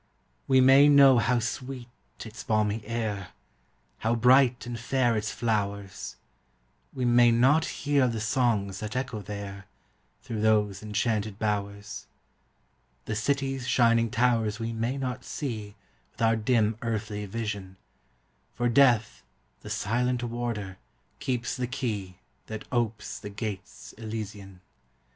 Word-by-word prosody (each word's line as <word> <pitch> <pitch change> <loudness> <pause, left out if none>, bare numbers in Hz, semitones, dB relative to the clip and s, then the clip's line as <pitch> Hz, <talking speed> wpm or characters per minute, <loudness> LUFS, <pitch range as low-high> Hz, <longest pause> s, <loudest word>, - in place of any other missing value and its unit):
We 130 -1 +5
may 135 +3 +7
know 140 -3 +7
how 120 +3 +2
sweet 125 +2 -4 0.4
its 110 0 -9
balmy 105 0 0
air, 110 -5 -3 0.7
How 115 +1 +1
bright 125 +1 +4
and 120 -1 -5
fair 120 0 +1
its 105 0 -1
flowers; 100 - -2 0.8
We 130 -2 -2
may 120 0 +6
not 135 +7 +4
hear 140 -2 +1
the 115 -2 -2
songs 105 -4 0
that 105 +1 -5
echo 125 -4 -3
there, 100 -2 -7 0.6
Through 110 -2 -4
those 105 -3 +2
enchanted 105 -1 -1
bowers. 100 -1 -3 1.0
The 110 - -3
city's 135 +3 -1
shining 115 -1 +3
towers 115 -3 +1
we 115 0 -3
may 115 +4 -2
not 125 -2 -3
see 110 -9 -5 0.4
With - - -12
our 115 0 +4
dim 110 -1 +1
earthly 105 -2 -3
vision, 100 -3 -5 0.8
For 120 0 +1
Death, 120 -3 +4 0.4
the - - -10
silent 125 +3 0
warder, 115 -5 -4 0.4
keeps 125 -4 -2
the 125 -1 -2
key 105 -8 -4 0.3
That 110 -1 -6
opes 110 -4 -2
the 105 - -7
gates 105 -1 -7
elysian. 105 -4 -7
115 Hz, 125 wpm, -27 LUFS, 105-125 Hz, 1.0 s, may